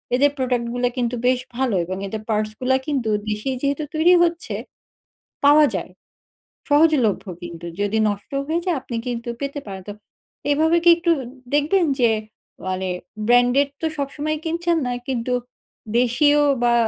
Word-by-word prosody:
এদের 285 +3 +4
প্রোডাক্ট 250 -2 0
গুলা 245 0 +1
কিন্তু 245 -1 0
বেশ 255 0 +3 0.2
ভালো! 255 -5 +1
এবং 185 +2 -4
এদের 215 +2 -5
পার্টসগুলা 215 +4 0
কিন্তু 265 -7 -1 0.2
দেশেই 215 +5 -2
যেহেতু 280 +2 0
তৈরি 330 +3 +5
হচ্ছে, 340 0 -1 0.9
পাওয়া 295 +1 +7
যায়। - - -4 0.8
সহজলভ্য 290 -8 +3 0.2
কিন্তু 170 -1 -8 0.2
যদি 205 +2 0
নষ্ট 205 0 -6 0.2
হয়ে 325 +2 0
যায়, 355 -4 +1
আপনি 245 - -6
কিন্তু 240 0 -3
পেতে 280 +1 -3
পারেন। 190 -1 -7
তো 205 - -5 0.6
এইভাবে 320 +3 +3
কি 345 - +6
একটু 340 0 +1 0.4
দেখবেন 315 +6 +3
যে, 240 -2 +5 0.6
মানে 185 0 -2 0.4
ব্র্যান্ডের 245 +3 +4
তো - - -1
সবসময়ই 295 +2 -2
কিনছেন 340 +1 0
না, - - -1 0.2
কিন্তু 250 -1 -1 0.7
দেশীয় 270 +5 +3 0.2
বা 240 0 +4
260 Hz, 145 wpm, -22 LUFS, 230-300 Hz, 0.9 s, পাওয়া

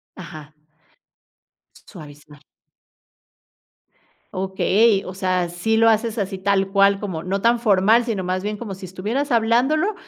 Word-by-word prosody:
Ajá. 155 -4 -11 1.3
Suavizar. 150 -4 -14 2.0
Okey, 195 +2 +1
o 185 - -7
sea, 185 -1 -1
sí 175 +6 -1
lo 225 0 +5
haces 220 +1 0
así 195 -1 -3
tal 195 0 0
cual 200 0 +3
como 185 -6 -5
no 190 +3 -3
tan 235 +1 +3
formal, 220 +1 +3
sino 220 -5 -3
más 185 +1 -2
bien 210 +1 -4
como 210 -3 -7
si 190 0 -9
estuvieras 220 +10 -3
hablándolo 250 - +2
195 Hz, 130 wpm, -21 LUFS, 185-225 Hz, 2.0 s, lo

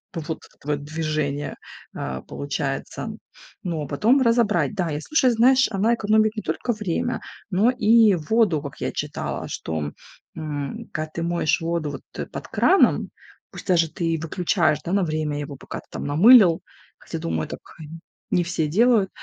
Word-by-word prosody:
Вот 160 -2 -5 0.2
это - - -23
твоё 145 0 -2
движение, 150 -1 -3 0.4
э, 65 0 -4
получается. 70 +1 -4 0.5
Ну, 165 -4 -2
а - - -6
потом 230 - +3
разобрать. 230 -2 +2
Да, 180 -5 -1
и 150 - -2
слушай, 265 - +2
знаешь, 255 +3 +5
она 215 +4 +2
экономит 215 0 +3
не 215 - -3
только 240 - -2
время, 210 -6 -2 0.3
но 210 +7 +4
и 225 -3 +5
воду, 175 -1 +2
как 140 -2 -8
я - - -1
читала. - - -4
Что, 80 -2 -4 0.5
м, 145 -3 -5
когда 155 0 -3
ты 170 - -2
моешь 170 -1 +1
воду 165 -2 -2
вот, 135 - -7
э, - - -3
под - - -8
краном, 385 - +3 0.4
пусть - - -10
даже 170 -3 +3
ты 165 -2 -1
выключаешь, 165 -1 +1
да, 170 - -3
на 195 0 +2
время 155 -2 -2
его, 145 -1 -6
пока - - -8
ты - - -17
там - - -6
намылил, 175 - +7 0.4
хотя, - - -6
думаю, 80 -1 -2
так - - -7 0.7
не 180 - +3
все 170 -2 -1
делают, 215 +3 +3
170 Hz, 165 wpm, -23 LUFS, 150-215 Hz, 0.7 s, намылил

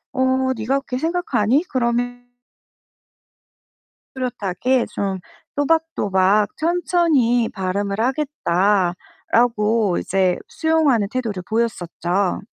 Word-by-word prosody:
"어 260 0 +1
네가 260 +5 0
그렇게 250 -2 -5
생각하니? 295 - +1
그럼" 235 -2 0 2.2
"뚜렷하게 245 0 -1
좀 195 -2 -3 0.4
또박또박 210 -11 +1
천천히 315 -8 +2
발음을 200 +2 -2
하겠다."라고 215 - +1
이제 185 -1 +1
수용하는 305 -10 +2
태도를 220 -8 -3
보였었죠. 195 -4 -1
235 Hz, 215 characters per minute, -21 LUFS, 200-270 Hz, 2.2 s, 천천히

